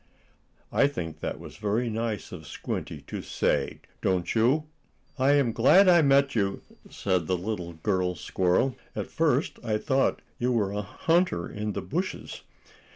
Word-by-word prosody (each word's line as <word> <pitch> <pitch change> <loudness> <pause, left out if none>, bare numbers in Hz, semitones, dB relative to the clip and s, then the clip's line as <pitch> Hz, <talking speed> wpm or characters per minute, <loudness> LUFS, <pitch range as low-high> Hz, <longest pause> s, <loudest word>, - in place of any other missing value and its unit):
I 140 - +4
think 85 - -5
that - - -4
was - - -10
very 105 +4 0
nice 110 -2 -3
of 80 -5 -9
Squinty - - -5
to - - -6
say, - - -1 0.2
don't 90 -2 0
you? 125 +7 +3 0.6
"I 135 +2 +4
am 140 -5 +3
glad 135 - +6
I 175 -2 +7
met 140 -1 +4
you," 100 -3 -1 0.3
said 90 -5 -1
the 90 - +1
little 90 -2 -4
girl 90 +2 0
squirrel. 90 - +1 0.2
"At - - -4
first - - +1
I 110 -1 0
thought 135 +4 +1 0.2
you 125 0 +1
were 105 -5 +1
a 105 0 -2
hunter 165 - +1
in 105 0 -4
the 100 - -4
bushes." 175 - -4
110 Hz, 160 wpm, -27 LUFS, 95-135 Hz, 0.6 s, I